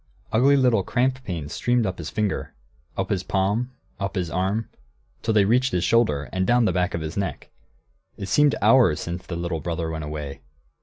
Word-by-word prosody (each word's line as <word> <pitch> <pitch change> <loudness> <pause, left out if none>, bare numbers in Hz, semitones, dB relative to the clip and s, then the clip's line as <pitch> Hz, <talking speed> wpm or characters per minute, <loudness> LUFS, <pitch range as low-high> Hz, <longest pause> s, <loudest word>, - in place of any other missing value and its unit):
Ugly 135 +5 +5
little 125 -6 +4
cramp 130 +5 0
pains 80 -6 -4
streamed 120 -2 +1
up 95 -2 -3
his 80 - -5
finger, 105 -2 -2 0.4
up - - -2
his 95 - +1
palm, 100 +7 0 0.3
up 100 0 -3
his 90 -3 -2
arm, 95 +5 -1 0.5
till 110 - 0
they 100 -2 +5
reached 125 +5 +3
into - - +1
his 90 - -1
shoulder, 105 -13 +2
and 95 0 0
down 120 -1 +4
the - - +2
back 90 0 0
of 85 - -3
his 80 +1 -5
neck. 100 -1 -4 0.7
It - - -5
seemed 145 +9 +3
hours 105 - +5
since 85 +2 -5
the 85 - -4
little 85 -1 -2
brother 80 0 -3
went 80 -1 -4
away. 75 -2 -6
95 Hz, 200 wpm, -24 LUFS, 85-115 Hz, 0.7 s, Ugly